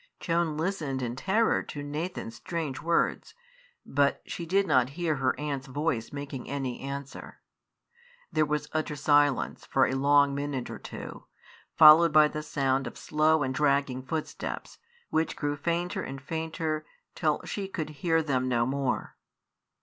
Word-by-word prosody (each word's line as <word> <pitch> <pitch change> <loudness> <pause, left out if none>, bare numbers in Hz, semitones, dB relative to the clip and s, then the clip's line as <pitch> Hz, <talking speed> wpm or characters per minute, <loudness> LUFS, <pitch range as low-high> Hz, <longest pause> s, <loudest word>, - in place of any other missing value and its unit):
Joan 165 -3 0
listened 155 -7 -2
in 120 0 -3
terror 210 - +2
to 145 - -7
Nathan's 150 -4 -4
strange 150 +2 -4
words, 170 - 0 0.5
but 140 0 +2
she 170 - -6
did 195 +3 +3
not 130 -7 +3
hear 165 -4 0
her 130 -1 0
aunt's 140 -3 -3
voice 135 -4 -2
making 140 -2 -6
any 135 -3 -3
answer. 140 0 -7 0.9
There 155 -2 +2
was 150 0 -1
utter 155 -1 -1
silence 145 -1 +2
for - - +3
a - - -1
long 140 +1 +4
minute 140 -2 -3
or - - -7
two, - - -9 0.5
followed 160 +2 +9
by 155 0 +6
the 150 - -4
sound 135 -3 0
of - - -8
slow 155 0 +2
and 130 0 -1
dragging 140 -2 +1
footsteps, 155 +4 -5 0.3
which 160 +1 0
grew 145 -1 -1
fainter 170 +4 -1
and 135 +1 -6
fainter 160 +2 -3 0.3
till - - +1
she 200 -2 -4
could 160 -5 -4
hear 165 -2 +2
them 130 -4 0
no 120 -2 +2
more. 135 0 -2
145 Hz, 150 wpm, -28 LUFS, 135-160 Hz, 0.9 s, followed